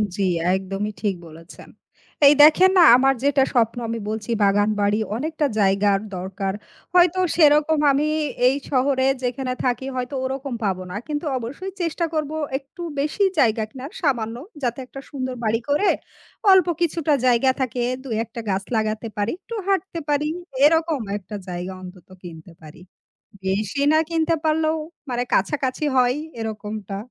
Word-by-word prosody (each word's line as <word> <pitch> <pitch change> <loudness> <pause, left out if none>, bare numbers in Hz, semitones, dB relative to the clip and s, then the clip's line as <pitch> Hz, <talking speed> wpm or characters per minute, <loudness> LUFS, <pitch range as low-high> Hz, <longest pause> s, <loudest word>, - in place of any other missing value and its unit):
জি, 200 - -1 0.3
একদমই 195 +2 -3
ঠিক 200 -3 0
বলেছেন 165 +1 -14 0.6
এই 285 - +8
দেখেন 365 +5 +7
না 355 - +8
আমার 270 +1 +3
যেটা 280 -1 +3
স্বপ্ন 230 -1 +2
আমি 230 0 -3
বলছি 215 +1 -5
বাগানবাড়ি 205 +1 +2 0.2
অনেকটা 310 +3 -2
জায়গার 195 0 +3 0.2
দরকার, 190 +1 -4 0.4
হয়তো 360 0 +4 0.2
সেরকম 300 -1 +4
আমি 285 +2 +1 0.4
এই 260 - +3 0.2
শহরে 260 0 +2 0.2
যেখানে 255 +1 -2
থাকি, 250 +1 0
হয়তো 255 +2 -3
ওরকম 265 0 -4
পাবো 185 -2 -1
না 180 - -6
কিন্তু 300 +1 -3
অবশ্যই 280 +11 -6
চেষ্টা 335 0 -1
করব 310 -1 -1 0.3
একটু 280 +6 -13 0.2
বেশি 300 +8 0 0.2
জায়গা 225 -4 +3
কেনার 265 +6 -9
সামান্য। 235 -7 0 0.3
যাতে 240 +1 -1
একটা 270 - -10
সুন্দর 260 -2 -4
বাড়ি 225 +1 +1
করে 295 +9 +3 0.6
অল্প 375 -2 +6
কিছুটা 325 -2 +1
জায়গা 250 +2 +4
থাকে 250 -1 -1 0.2
২ 270 - -9
১ 230 - -14
টা 230 - -4
গাছ 195 0 0
লাগাতে 215 +1 -1
পারি 205 +2 0
একটু 465 - -8
হাঁটতে 385 -3 -1
পারি 295 +1 +1 0.4
এরকম 320 -3 +2 0.2
একটা 210 +1 -9
জায়গা 180 +1 -5
অন্তত 180 -1 -12 0.2
কিনতে 165 0 -11
পারি। 155 +2 -13 0.6
বেশি 205 +7 -1
না 315 - +5
কিনতে 330 0 +1
পারলেও 315 0 +1 0.3
মানে 245 0 -1
কাছাকাছি 260 +7 0
হয় 250 0 +3 0.2
এরকমটা। 210 -2 -5
255 Hz, 150 wpm, -22 LUFS, 210-300 Hz, 0.6 s, এই